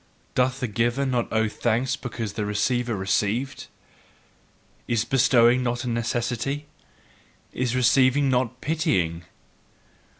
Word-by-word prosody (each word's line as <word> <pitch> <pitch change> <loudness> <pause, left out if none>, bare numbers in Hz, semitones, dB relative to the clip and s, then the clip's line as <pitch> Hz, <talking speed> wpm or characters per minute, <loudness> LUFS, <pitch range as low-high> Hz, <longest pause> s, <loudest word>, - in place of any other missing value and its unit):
Doth 130 +1 +1
the 125 - 0
giver 120 +5 0
not 125 -3 -1
owe 110 0 +2
thanks 120 +3 0
because 115 -4 -5
the 105 - -3
receiver 120 +3 0
received? 105 +7 -1 1.2
Is 120 -1 0
bestowing 120 -1 +4
not 120 0 -2
a - - -5
necessity? 120 +4 -2 0.9
Is 125 -1 -1
receiving 130 +3 +3
not 125 -1 0
pitying?" 90 - 0
120 Hz, 110 wpm, -24 LUFS, 115-130 Hz, 1.2 s, bestowing